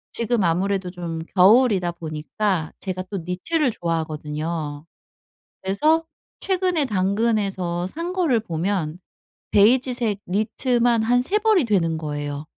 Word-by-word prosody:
지금 230 -2 +1
아무래도 185 +2 0
좀 170 -2 -5 0.2
겨울이다 195 -2 +5
보니까 165 +2 -2
제가 185 -1 -4
또 200 - -3
니트를 255 - 0
좋아하거든요. 155 -3 -3 0.8
그래서 305 +13 +2 0.4
최근에 365 -5 +1
당근에서 195 -4 0
산 335 - -5
거를 340 -10 +2
보면 175 -4 -2 0.5
베이지색 235 -1 +3
니트만 235 +4 +1
한 245 +2 +3
3 380 +12 0
벌이 425 - +3
되는 170 -7 +1
거예요. 145 -1 -4
195 Hz, 265 characters per minute, -23 LUFS, 170-245 Hz, 0.8 s, 겨울이다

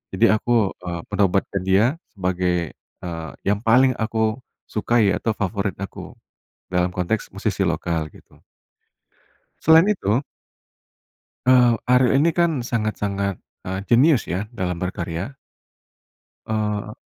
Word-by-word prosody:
Jadi - - +4
aku, 110 -2 +2 0.2
eee, 85 -1 -3
menobatkan 100 -1 +1
dia 115 - +3 0.2
sebagai, 90 -3 -1
eee, 80 -2 -8
yang 100 +1 +1
paling 125 +3 +4
aku 110 +1 0 0.3
sukai 110 -2 +2
atau 110 +2 -1
favorit 100 0 -2
aku, 100 +1 -8 0.5
dalam 90 0 0
konteks 95 +5 -2
musisi - - -1
lokal 80 -2 -2
gitu. - - -19 1.3
Selain 160 +3 +6
itu 115 - 0 1.3
eee, 125 -2 +6 0.2
Ariel 125 0 +4
ini 170 - +4
kan 165 -7 +2
sangat-sangat, 100 -5 -2 0.2
eee, 95 +1 -3
jenius 130 +3 +4
ya 95 +4 -2
dalam 90 -5 -2
berkarya. 90 +4 -4 1.1
Eee. 105 -1 -2
105 Hz, 115 wpm, -22 LUFS, 90-120 Hz, 1.3 s, Selain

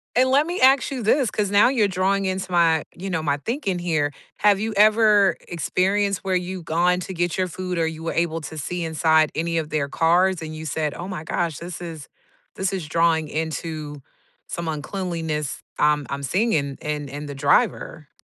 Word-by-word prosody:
And 255 +2 +4
let 285 +4 +4
me 355 +2 -3
ask 265 0 +5
you 260 -4 -4
this, 250 +3 +3
'cause 205 -2 -1
now 205 +3 +6
you're 235 -6 +2
drawing 195 +1 0
into 190 0 -3
my, 165 -3 +3
you 190 +2 -6
know, 170 -4 -1
my 145 -2 0
thinking 210 - -2
here. 160 -4 0 0.3
Have 205 -1 +4
you 220 +1 -2
ever 210 -1 +5
experienced 195 +3 0
where 190 -1 0
you 180 0 -3
gone 175 +3 +2
to 190 - -6
get 175 0 -1
your 185 -1 +1
food 180 0 -4
or 165 - +2
you 160 0 -5
were 165 - -2
able 165 -1 0
to 155 +1 -8
see 175 +4 -3
inside 160 -1 +3
any 165 +1 -1
of 155 -1 -5
their 150 -2 -1
cars 175 +4 +2
and 155 -1 -6
you 155 0 -7
said, 155 -1 -2
"Oh, 175 - -6
my 185 -5 -5
gosh, 160 -1 -2
this 175 0 -7
is 160 -5 -7 0.5
this 190 0 -1
is 180 -5 -4
drawing 160 -1 +2
into 155 -2 -4 0.5
some 170 -1 -5
uncleanliness 160 -2 -3 0.2
I'm 150 -1 +2
I'm 140 0 -4
singing 145 - 0
in 150 -1 -3
in - - -10
in 145 +2 -6
the 140 - -7
driver?" 150 - +1
170 Hz, 200 wpm, -23 LUFS, 155-195 Hz, 0.5 s, now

